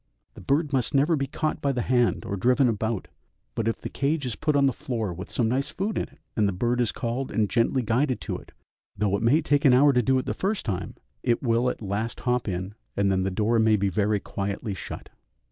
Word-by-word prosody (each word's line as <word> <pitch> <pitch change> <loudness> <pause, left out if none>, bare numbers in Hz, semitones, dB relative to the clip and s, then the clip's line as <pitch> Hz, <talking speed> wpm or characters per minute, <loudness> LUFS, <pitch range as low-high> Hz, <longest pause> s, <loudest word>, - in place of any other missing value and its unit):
The - - -12
bird 150 +1 0
must 130 +2 0
never 145 +5 +4
be 140 -2 -1
caught 155 +3 -2
by 140 - +1
the 125 -3 -1
hand 120 -1 +1
or 100 - -2
driven 125 +7 +3
about, 110 -2 -1 0.5
but 115 - -2
if 115 - -1
the - - -5
cage 140 +1 -1
is 120 -4 -2
put 150 +5 0
on 140 -1 +4
the 135 - +3
floor 115 - -3
with 90 +3 -8
some 120 - 0
nice 130 +4 0
food 205 +3 -3
in - - 0
it, - - -23 0.2
and 105 -2 +3
the - - +1
bird 120 +6 0
is 120 - +1
called 120 +3 -3
and 110 -2 +1
gently 120 +4 +1
guided 125 +4 +1
to - - -3
it, - - -15 0.5
though 100 -1 +1
it 100 - -2
may 140 +8 +3
take 145 -1 +2
an 135 -4 +6
hour 140 +3 +6
to 125 - +4
do 130 +3 +2
it 130 - -1
the - - -1
first 200 +1 -2
time, 95 -6 -3 0.3
it 120 +2 +1
will 120 0 +2
at 115 - -5
last 105 +4 -3
hop 125 -2 0
in, 95 +1 -3 0.2
and 100 -1 +2
then 95 -1 +1
the 95 - 0
door 110 +5 +1
may 110 -1 +4
be 100 -1 +1
very 105 +2 +1
quietly 100 +2 -4
shut. 95 - -8
120 Hz, 250 wpm, -26 LUFS, 105-135 Hz, 0.5 s, an